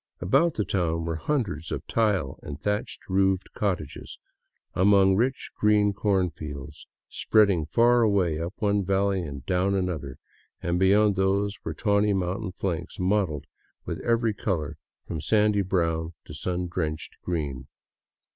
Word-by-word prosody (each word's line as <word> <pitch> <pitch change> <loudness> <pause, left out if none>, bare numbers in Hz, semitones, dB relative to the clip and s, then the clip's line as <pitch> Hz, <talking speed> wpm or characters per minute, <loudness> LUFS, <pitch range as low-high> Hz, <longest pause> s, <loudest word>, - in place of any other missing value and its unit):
Abotit 135 - +2
the 105 - -1
town 85 -3 -1
were 80 -1 -2
hundreds 95 - -2
of - - -4
tile 105 - 0
and 70 - -7
thatch 105 0 -2
roofed 95 0 +1
cottages 90 -7 -3 0.6
among 95 0 +5
rich, 125 +6 -1
green 105 -1 +3
cornfields, 85 -9 -2 0.2
spreading 100 -8 +2
far 120 +8 +4
away 95 -8 +2
up 85 +3 -4
one 105 -3 +1
valley 95 0 +1
and 70 -5 -7
down 95 +2 +1
another; 80 -8 -3 0.4
and 85 0 -1
beyond 100 +1 +4
these 100 +1 +1
were - - -4
tawny 105 -1 +2
mountain 95 +2 -2
flanks 90 0 -4
mottled 90 -6 0 0.4
with - - -4
every 115 -1 +1
color 80 -8 -2 0.3
from 80 -3 -4
sandy 105 +1 +3
brown 85 -3 -1
to - - -10
sun 90 +3 -3
drenched 80 -3 -4
green. 70 -7 -3
95 Hz, 135 wpm, -26 LUFS, 80-105 Hz, 0.6 s, among